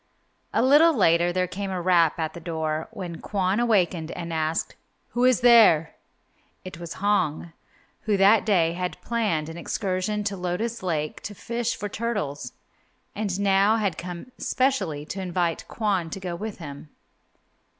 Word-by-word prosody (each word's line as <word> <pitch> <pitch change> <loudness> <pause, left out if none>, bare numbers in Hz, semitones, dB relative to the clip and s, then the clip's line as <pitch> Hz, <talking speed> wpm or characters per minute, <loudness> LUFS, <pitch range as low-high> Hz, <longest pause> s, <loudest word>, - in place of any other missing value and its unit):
A - - +2
little 300 +5 +6
later 170 -2 +4
there 185 +1 +1
came 195 +2 -5
a 185 -1 -2
rap 170 -3 +3
at 160 -2 -2
the 170 - -8
door, 160 -2 -3
when 180 -7 -7
Kwon 195 +1 0
awakened 185 -8 +1
and 170 -1 -5
asked, 160 0 -1 0.3
"Who 245 +1 +1
is 255 -1 +4
there?" 225 -10 +6 0.7
It 185 -2 -8
was 170 -1 -6
Hong, 170 -5 0 0.5
who 210 -3 +2
that 200 +2 +5
day 170 -6 +2
had 180 +1 -4
planned 210 -10 -1
an 165 +1 -8
excursion 195 +2 -2
to 205 -1 -2
Lotus 190 +6 -3
Lake 155 -5 -2
to 205 - -7
fish 235 +3 -2
for 205 - -4
turtles, 200 - -3 0.6
and 200 -3 -2
now 200 +2 +4
had 200 -6 0
come 180 +7 -7
specially 195 - 0
to 195 +4 -5
invite 175 -2 -1
Kwon 195 -7 -1
to 195 - -6
go 180 -2 -4
with 215 +3 -6
him. 145 -2 -9
185 Hz, 160 wpm, -25 LUFS, 165-210 Hz, 0.7 s, little